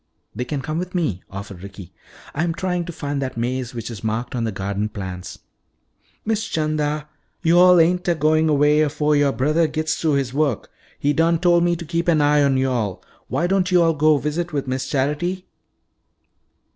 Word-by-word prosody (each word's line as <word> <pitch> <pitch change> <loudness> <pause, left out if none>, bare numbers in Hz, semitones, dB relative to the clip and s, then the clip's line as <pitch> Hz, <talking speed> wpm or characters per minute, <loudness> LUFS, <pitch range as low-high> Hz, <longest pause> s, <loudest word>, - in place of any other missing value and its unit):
"They 125 - -4
can 140 +1 -4
come 155 +1 -2
with 180 +1 -5
me," 130 - -1
offered 100 -2 -8
Ricky. 100 -2 -11 0.4
"I'm 165 +2 -1
trying 180 0 -2
to 170 - -6
find 145 -3 -4
that 130 -3 -4
maze 125 +1 -2
which 115 0 -5
is 110 -2 -9
marked 110 +2 -2
on 120 -2 -1
the 110 - -1
garden 100 +2 -3
plans." 95 -3 -7 0.9
"Miss 220 0 -1
'Chanda, 155 -1 -1 0.4
yo'all 175 +1 +6
ain't 180 +3 +2
a'goin' 155 -1 +2
'way 150 +1 +4
'afo' 150 0 0
yoah 145 -1 +3
brothah 150 +7 +1
gits 155 +1 -1
through 160 -2 0
his 135 -3 0
wo'k. 140 -6 0 0.3
He 145 +1 +1
done 165 +2 +3
tol' 175 0 +3
me 175 0 +2
to 170 0 -7
keep 170 +2 -2
an 165 -3 +4
eye 145 0 +4
on 140 -2 +3
yo'all. 125 -7 -1 0.2
Why 170 - -1
don't 185 0 +1
yo'all 170 -3 +4
go 155 0 +3
visit 165 +4 -2
wi' 145 -3 -1
Miss 130 0 -3
Charity?" 155 +7 -1
150 Hz, 185 wpm, -21 LUFS, 125-170 Hz, 0.9 s, yo'all